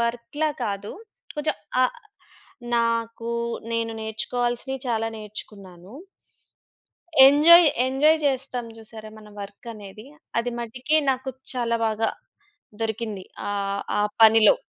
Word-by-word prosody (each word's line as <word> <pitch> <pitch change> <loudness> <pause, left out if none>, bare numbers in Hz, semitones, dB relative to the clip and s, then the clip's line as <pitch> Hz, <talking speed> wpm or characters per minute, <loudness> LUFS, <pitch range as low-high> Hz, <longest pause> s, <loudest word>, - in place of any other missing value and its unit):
వర్క్‌లా 235 +6 -1 0.2
కాదు. 200 -1 -4 0.4
కొంచెం 300 +1 -1 0.3
ఆహ్, 255 - 0 0.8
నాకు 230 0 -1 0.4
నేను 230 0 -1
నేర్చుకోవాల్సినియి 240 +4 -2
చాలా 225 -1 0
నేర్చుకున్నాను. 200 -2 -10 1.3
ఎంజాయ్, 325 +5 +8 0.2
ఎంజాయ్ 300 +5 +3
జేస్తాం 260 -3 -1
చూసారా 220 0 -11
మన 210 -1 -14
వర్కనేది. 205 +1 -10 0.3
అది 245 - -3
మటికి 250 +6 -1
నాకు 260 0 -2 0.2
చాలా 235 -2 0
బాగా 220 0 0 0.7
దొరికింది. 220 -3 -3 0.3
ఆహ్, 200 0 -2 0.2
ఆ - - +3 0.2
పనిలో. 225 - +7
230 Hz, 100 wpm, -24 LUFS, 215-255 Hz, 1.3 s, ఎంజాయ్